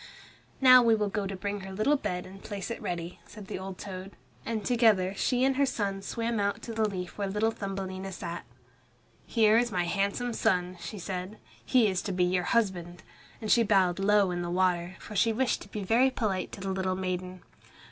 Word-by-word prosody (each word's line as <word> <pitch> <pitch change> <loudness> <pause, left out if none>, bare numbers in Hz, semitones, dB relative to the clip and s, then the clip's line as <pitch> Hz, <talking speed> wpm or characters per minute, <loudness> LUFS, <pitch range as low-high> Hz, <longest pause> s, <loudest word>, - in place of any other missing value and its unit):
"Now 255 -1 +9
we 230 -2 +4
will 210 -1 0
go 200 -1 -2
to 195 - -4
bring 200 +2 -3
her 190 0 -8
little 215 +10 +2
bed 180 -10 -3
and 195 +1 -12
place 200 +1 -5
it 230 - -5
ready," 175 0 -4
said 210 -2 -11
the 190 - -5
old 190 0 -7
toad, 190 0 -7 0.3
and 220 -3 -2
together 215 -6 +3
she 250 +4 +1
and 265 0 +2
her 280 - +4
son 200 -5 -2
swam 230 +3 -2
out 200 0 -1
to 230 - -5
the 220 -1 +1
leaf 180 0 -6
where 200 - 0
little 210 +3 +1
Thumbelina 195 -2 -5
sat. 170 -1 -6 0.8
"Here 220 -1 +4
is 240 0 0
my 180 -1 +1
handsome 200 +7 -1
son," 180 -3 0
she 210 - -7
said, 185 +2 -5 0.3
"he 245 -4 +4
is 185 -2 0
to 200 - -4
be 180 -1 +1
your 180 0 +1
husband," 175 -7 0 0.4
and 215 - -2
she 235 - +6
bowed 195 -5 +3
low 200 -1 +3
in 175 0 -2
the 175 - -3
water, 180 0 +1
for 210 - -9
she 225 +4 +3
wished 250 +3 0
to - - -10
be 210 0 -5
very 235 +7 +4
polite 210 -7 -2
to 195 - -8
the 195 0 -2
little 190 -1 -1
maiden. 185 -1 -4
195 Hz, 210 wpm, -29 LUFS, 185-220 Hz, 0.8 s, Now